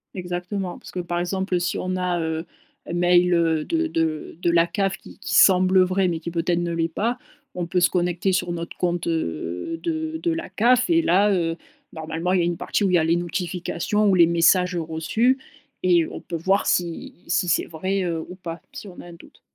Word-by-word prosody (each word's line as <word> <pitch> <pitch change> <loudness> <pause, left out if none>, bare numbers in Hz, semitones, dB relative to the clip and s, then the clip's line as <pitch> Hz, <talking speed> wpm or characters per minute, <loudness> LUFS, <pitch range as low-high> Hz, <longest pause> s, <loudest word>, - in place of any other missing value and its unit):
Exactement, 180 +1 -4
parce - - -12
que, 180 - -5
par 175 0 -2
exemple, 185 +1 -1
si 175 - -1
on 185 0 -2
a, 180 -1 -1
heu, 160 0 -2 0.4
un - - -5
mail, 175 0 +4
heu, 165 -2 +2
de 330 0 0
de 160 - -2
de 175 - +1
la 170 0 +4
CAF 195 +2 -1
qui - - -15
qui - - -2
semble 185 0 +6
vrai 185 +1 +1
mais 170 -2 -2
qui 170 +1 -6
peut-être 170 +1 0
ne 175 0 -2
l'est 165 0 0
pas, 230 +9 -2 0.3
on 175 -1 -4
peut 180 +1 +1
se 175 - +4
connecter 180 +1 0
sur 180 -1 0
notre 170 0 -5
compte, 175 -1 -1
heu, 90 - -3
de 320 -1 -2
de 340 0 0
la 330 +1 -4
CAF 245 +7 +3
et 335 -1 +3
là, 200 - +3
heu, 165 -3 0 0.4
normalement, 160 +3 -3
il 190 - +3
y - - +3
a - - +1
une 170 -1 -1
partie 205 - -1
où 195 - +2
il 180 - +3
y - - +6
a 160 - +2
les 165 +2 +2
notifications 175 +3 -1
ou 190 - +4
les 170 -2 +7
messages 180 +2 +3
reçus 170 +11 0 0.5
et 175 -3 +4
on - - -8
peut 170 - -6
voir 190 +5 +1
si 170 -2 -1
si 175 +1 +1
c'est 170 - +2
vrai, 190 +5 -2
heu, 170 -2 -2
ou 180 - -9
pas, 170 -3 -7
si 205 - -8
on 180 - -12
a - - -13
un 175 - -11
doute. 170 - -17
175 Hz, 225 wpm, -23 LUFS, 170-190 Hz, 0.5 s, les